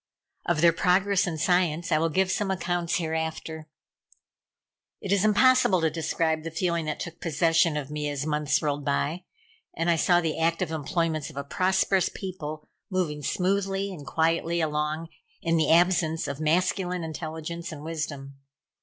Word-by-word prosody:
Of 170 -3 +1
their 170 -1 +6
progress 190 +3 +2
in 165 -2 -3
science 170 0 +1
I 155 - +4
will 165 +1 +1
give 190 +4 +1
some 205 0 -1
accounts 175 -2 -1
hereafter. 160 -1 -3 1.3
It 195 - -5
is 200 -1 +3
impossible 215 -2 +4
to 160 -1 +2
describe 160 0 0
the 165 - -5
feeling 170 0 -1
that 155 - -3
took 170 0 -7
possession 165 0 +2
of 145 -1 -5
me 150 -1 -2
as 145 0 -3
months 150 0 0
rolled 145 -1 -1
by, 150 +5 -1 0.5
and 165 +1 +2
I 165 - +2
saw 175 +2 +4
the 165 -2 -2
active 165 +1 0
employments 160 0 -1
of 150 - -13
a 140 - -2
prosperous 185 +4 +1
people 155 -5 -7 0.2
move 160 -6 -2
smoothly 195 +1 0
and 155 -5 -9
quietly 165 +4 0
along 155 +1 -1 0.3
in 165 0 0
the 160 - +2
absence 165 -1 +3
of 140 0 -4
masculine 180 +2 0
intelligence 160 +1 -5
and 150 -2 -8
wisdom. 145 -4 -5
165 Hz, 160 wpm, -26 LUFS, 155-180 Hz, 1.3 s, their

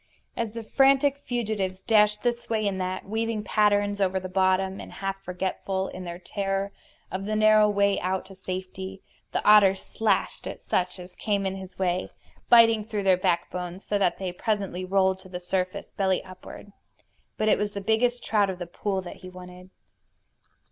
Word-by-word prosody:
As 230 -2 -3
the 230 -1 -6
frantic 275 +3 +4
fugitives 210 -6 -2
dashed 210 -2 +3
this 240 -1 -1
way 215 -2 +1
and 190 -2 -2
that, 185 0 -3
weaving 225 +1 -2
strange 210 - -13
patterns 205 -1 +3
over 190 0 +2
the 185 - -6
bottom, 190 +1 +1
and - - -9
half 195 0 -4
forgetful, 190 +1 -3
in 185 0 -8
their 170 0 -5
terror, 195 +2 -2 0.4
of 190 +1 -4
the 215 +1 -1
narrow 215 0 +5
way 200 -1 +2
out 185 +1 -2
to 195 0 -13
safety, 190 +1 -6 0.3
the - - -2
otter 205 -2 +7
slashed 205 +1 -1
at - - -8
such 180 0 0
as 180 0 -11
came 200 -2 0
in 190 0 -1
his 190 -1 -10
way, 185 -1 0 0.4
biting 230 -2 +7
through 210 -2 -3
their 190 -1 +5
backbones, 180 0 -2
so 205 - 0
that 185 -3 +2
they 185 -2 -4
presently 195 -2 -2
rolled 190 0 +2
to 185 - -14
the 180 -1 -5
surface, 185 +1 -3
belly 190 -2 0
upward. 185 +2 -12 0.7
But 215 - 0
it - - +4
was 205 0 -2
the 200 - -3
biggest 230 +4 +1
trout 205 -3 +2
of 185 - -4
the 175 - -5
pool 190 +2 -3
that 175 - -9
he 185 - -10
wanted. 180 0 -12
195 Hz, 185 wpm, -26 LUFS, 185-210 Hz, 0.7 s, otter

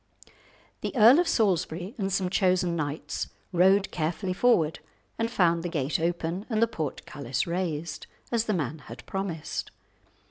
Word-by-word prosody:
The - - -4
Earl 240 +6 +8
of 350 - +2
Salisbury 185 -2 0
and 195 -1 -1
some 190 -1 +1
chosen 185 -3 +2
knights 145 -1 -3 0.2
rode 190 +3 +4
carefully 175 +3 -2
forward, 180 -7 +3 0.4
and 230 0 +1
found 170 -7 +2
the 175 - -3
gate 150 -3 -1
open 170 +3 -2
and 220 -3 0
the 230 - +6
portcullis 140 - -3
raised, 170 -3 -3 0.2
as 230 -2 +1
the 215 - 0
man 155 -2 -2
had - - -11
promised. 190 -5 -4
175 Hz, 145 wpm, -27 LUFS, 160-200 Hz, 0.4 s, Earl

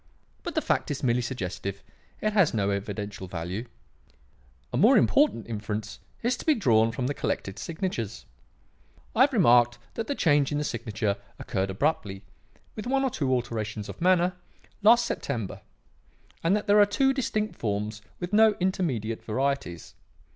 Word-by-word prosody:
But - - -6
the - - +1
fact - - 0
is 145 -2 -4
merely 125 -1 +2
suggestive; 100 -5 -4 0.4
it 215 0 0
has 195 - +3
no 100 -2 +1
evidential 100 -1 -4
value. 90 +6 -5 1.1
"A - - 0
more 235 +5 +6
important 275 - +3
inference 110 -1 -5 0.2
is 240 +2 +2
to - - -9
be 310 - +5
drawn 115 - +3
from 125 +2 -3
the 140 - 0
collected 95 -7 -3
signatures. 160 - -4 0.9
I 230 - +3
have 275 +2 +6
remarked 120 - +5 0.2
that 225 - -4
the 285 - -1
change 145 - +3
in 145 - 0
the 150 - 0
signature 110 -5 -2 0.2
occurred 95 +1 -2
abruptly, 100 - -1 0.5
with 215 +1 -6
one 270 +1 +2
or 265 - +1
two 135 -9 -1
alterations 110 -4 -2
of - - -9
manner, 180 0 +3 0.5
last 235 +3 +6
September, 110 -6 -4 0.8
and 170 +4 +3
that 210 - -2
there 205 +1 +5
are 205 - +6
two 270 +6 +2
distinct 215 -5 -1
forms 105 0 -2 0.2
with 175 +2 -5
no 215 0 +6
intermediate 140 - -1
varieties. 130 - -2
125 Hz, 160 wpm, -27 LUFS, -, 1.1 s, more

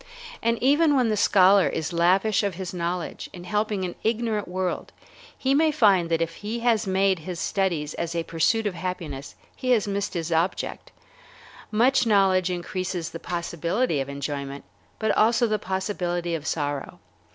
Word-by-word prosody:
And 230 0 +1
even 295 +3 +4
when 250 -4 +3
the 215 - +1
scholar 195 -1 +5
is 160 +2 -3
lavish 185 +5 +3
of 200 -4 -2
his 185 0 -5
knowledge 175 0 -3
in 175 - -9
helping 210 0 -1
an 175 - -4
ignorant 225 -2 0
world, 185 0 -3 0.5
he 265 +1 +1
may 315 +3 +4
find 200 - +3
that 165 0 +2
if 165 0 -6
he 220 +3 -4
has 230 -3 +2
made 190 -1 +2
his 170 +2 -6
studies 170 -7 -1
as 170 0 -4
a 165 - 0
pursuit 165 +8 +1
of 205 - 0
happiness 165 -7 -5 0.2
he 255 - -4
has 225 -5 +3
missed 200 -1 -2
his 170 0 -3
object. 165 +3 -1 0.8
Much 245 +3 +3
knowledge 190 -3 +3
increases 180 -1 -3
the 165 - -7
possibility 170 - -1
of 135 - -5
enjoyment, 140 0 -5 0.3
but 220 - 0
also 230 +2 +4
the 215 -2 0
possibility 180 -3 -2
of 160 -1 -4
sorrow. 145 -3 -3
185 Hz, 165 wpm, -25 LUFS, 170-215 Hz, 0.8 s, scholar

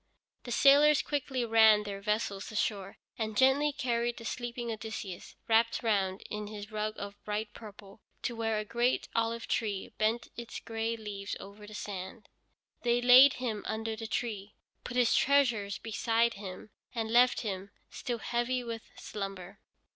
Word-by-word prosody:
The 245 - -6
sailors 285 +4 +6
quickly 265 -4 -1
ran 220 -2 +6
their 200 -1 -6
vessel 210 -1 0
ashore 200 -1 -3 0.2
and 220 -1 -2
gently 270 +3 +4
carried 240 -3 -1
the 230 - -9
sleeping 240 0 -4
Odysseus, 215 -4 -6
wrapped 230 +2 +3
round 195 -4 0
in 210 0 -5
his 210 +1 -8
rug 215 0 -2
of 205 0 -8
bright 210 +1 -3
purple, 205 -1 -12 0.2
to 240 - -2
where 225 -1 0
a 210 - -2
great 240 +3 +1
olive 230 0 -1
tree 205 -4 -2
bent 225 +2 +1
its 235 -1 -7
gray 225 0 -3
leaves 205 -2 -5
over 205 +1 -11
the 210 - -10
sand. 200 +2 -7 0.5
They 240 0 +2
laid 250 +3 +8
him 225 -5 -3
under 220 0 -2
the 225 0 -6
tree, 215 -4 -3 0.3
put 245 - -5
his 245 -2 +4
treasures 240 -8 +3
beside 230 +1 +1
him, 195 +1 -9 0.2
and 225 -1 -2
left 245 +2 +5
him, 195 -3 -4 0.2
still 245 -3 -3
heavy 240 +2 -1
with 230 -1 -5 0.2
slumber. 195 -3 -6
225 Hz, 155 wpm, -31 LUFS, 210-240 Hz, 0.5 s, laid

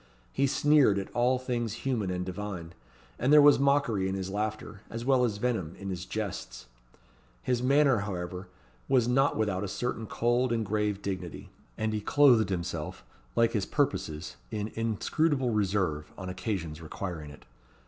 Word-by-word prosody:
He 140 - +2
sneered 135 -5 +4
at 100 - -4
all 125 +1 +3
things 120 -4 -2
human 115 -8 0
and 90 0 -2
divine; 90 -3 -6 0.5
and 130 +4 +2
there 150 - +9
was 145 -1 +7
mockery 135 -9 +2
in 95 - -2
his 95 0 -4
laughter, 105 0 -4
as 115 +1 -5
well 130 -2 +4
as 110 -4 0
venom 105 -8 -1
in 95 -1 -6
his 90 0 -5
jests. 100 -7 -5 0.8
His 125 -2 0
manner, 135 -2 +4
however, 90 -2 -5 0.4
was 125 -3 +4
not 135 +3 +3
without 105 -3 0
a - - -2
certain 115 +2 -3
cold 120 +3 +1
and 115 -2 0
grave 105 -1 -1
dignity; 95 -4 -5 0.3
and 110 0 -1
he 105 - -1
clothed 120 -5 +5
himself, 85 -4 -4 0.3
like 115 0 +4
his 105 -4 0
purposes, 75 +2 -1
in 105 -1 -3
inscrutable 125 - 0
reserve, 95 -8 0
on 95 -2 -6
occasions 90 -4 -4
requiring 80 -1 -6
it. 75 - -14
105 Hz, 160 wpm, -29 LUFS, 95-125 Hz, 0.8 s, there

